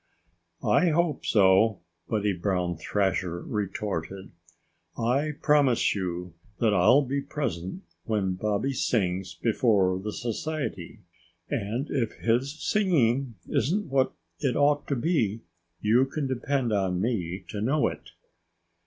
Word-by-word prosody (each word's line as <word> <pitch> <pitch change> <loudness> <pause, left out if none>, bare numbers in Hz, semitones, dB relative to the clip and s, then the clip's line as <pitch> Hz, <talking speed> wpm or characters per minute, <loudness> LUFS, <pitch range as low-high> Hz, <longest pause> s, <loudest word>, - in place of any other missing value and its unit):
"I 180 - +4
hope 160 -2 0
so," 100 0 +4 0.3
Buddy 105 -2 +1
Brown 90 -1 -1
Thrasher 90 0 -1
retorted. 95 -2 -4 0.7
"I 135 +6 +1
promise 145 -5 +4
you 90 -3 -4 0.3
that 110 -3 +3
I'll 100 +10 +5
be 140 +2 -2
present 140 - -4 0.2
when 100 -4 0
Bobby 105 +7 -1
sings 95 -8 -1
before 100 -2 +2
the 105 +3 -4
Society. 120 - -4 0.5
And 115 +8 -2
if 120 -6 0
his 130 +6 0
singing 135 - +2
isn't 190 +4 0
what 135 -1 +2 0.3
it 135 -5 0
ought 145 0 +2
to 140 - 0
be, 115 - 0 0.4
you 120 +5 +4
can 145 +1 -3
depend 130 -2 -1
on 95 -3 0
me 95 -5 -2
to 105 - -4
know 145 +7 +2
it." - - -7
115 Hz, 120 wpm, -27 LUFS, 95-140 Hz, 0.7 s, I'll